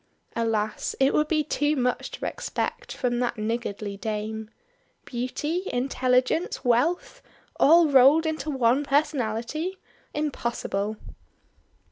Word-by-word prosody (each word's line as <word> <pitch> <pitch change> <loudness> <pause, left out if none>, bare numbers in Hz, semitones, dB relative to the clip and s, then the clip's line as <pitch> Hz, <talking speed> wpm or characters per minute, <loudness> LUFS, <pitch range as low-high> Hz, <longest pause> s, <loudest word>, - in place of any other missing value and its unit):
Alas! 220 -2 -1
it 270 +1 +4
would 300 - +2
be 310 -1 +1
too 295 0 0
much 250 -2 0
to - - -6
expect - - -3
from 240 -1 -1
that 245 -1 -1
niggardly 215 -2 -3
Dame. 215 +1 -4 0.6
Beauty, 295 +9 -3
intelligence, 255 +5 +1
wealth! 320 - +1 0.4
All 330 +2 +6
rolled 280 +3 +6
into 315 0 -2
one 260 0 +2
personality. 285 - -1 0.4
Impossible! 235 -8 -2
255 Hz, 105 wpm, -26 LUFS, 230-300 Hz, 0.6 s, All